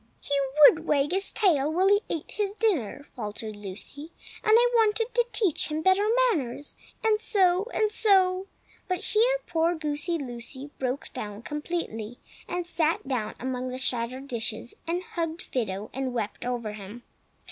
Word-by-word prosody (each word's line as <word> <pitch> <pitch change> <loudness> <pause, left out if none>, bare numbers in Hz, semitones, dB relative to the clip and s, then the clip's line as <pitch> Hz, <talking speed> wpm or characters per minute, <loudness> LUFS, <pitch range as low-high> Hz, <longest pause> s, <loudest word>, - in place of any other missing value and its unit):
"He 285 - -4 0.3
would 325 0 +2
wag 290 +1 +2
his 390 +2 0
tail 310 -8 +2
while 365 +4 +3
he 405 +1 +5
ate 320 - -4
his 405 -2 -2
dinner," 310 - 0
faltered 215 -2 -5
Lucy, 210 - -7 0.3
"and 435 - +4
I 485 +1 +5
wanted 450 +1 +2
to 480 -1 +2
teach 390 -12 +2
him 310 +1 -2
better 380 +2 +4 0.3
manners; 280 - -4 0.3
and 435 -1 +3
so—and 405 +2 +2
so—" 385 -3 +3 0.4
But 365 -1 -1
here 470 +4 +3
poor 335 0 +1
Goosey 305 +2 -1
Lucy 260 +1 -6
broke 260 +1 -3
down 210 -3 -6
completely, 295 -7 -4 0.3
and 355 0 -2
sat 325 -4 0
down 240 -6 -2
among 255 0 -3
the 255 - -4
shattered 255 +1 -1
dishes, 230 -2 -3
and 350 +2 -1
hugged 335 -1 -4
Fido 210 -4 -3
and 260 -1 -3
wept 225 +1 -3
over 235 -4 -2
him. 210 +3 -9
300 Hz, 155 wpm, -27 LUFS, 245-375 Hz, 0.4 s, he